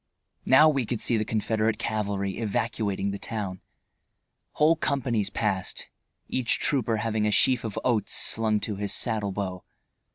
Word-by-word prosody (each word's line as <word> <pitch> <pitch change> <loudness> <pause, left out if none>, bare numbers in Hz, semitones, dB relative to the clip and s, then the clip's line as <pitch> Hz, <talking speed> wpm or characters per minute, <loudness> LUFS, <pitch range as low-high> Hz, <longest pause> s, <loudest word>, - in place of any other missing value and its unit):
Now 140 +4 +7
we 135 -6 +1
could 120 -1 -2
see 120 - +2
the 110 - +1
Confederate 110 0 0
cavalry 100 -2 -2
evacuating 105 -2 -1
the 100 - -5
town. 100 -4 -4 0.9
Whole 155 +2 +4
companies 125 -9 -1
passed, 95 -2 -2 0.4
each 125 -2 +1
trooper 120 -7 +1
having 110 0 0
a - - +1
sheaf 125 +4 +3
of 110 -3 -5
oats 115 -4 0
slung 110 -1 0
to 105 -3 -3
his 100 -1 0
saddle 110 -4 0
bow. 95 -2 -4
110 Hz, 150 wpm, -26 LUFS, 100-120 Hz, 0.9 s, Now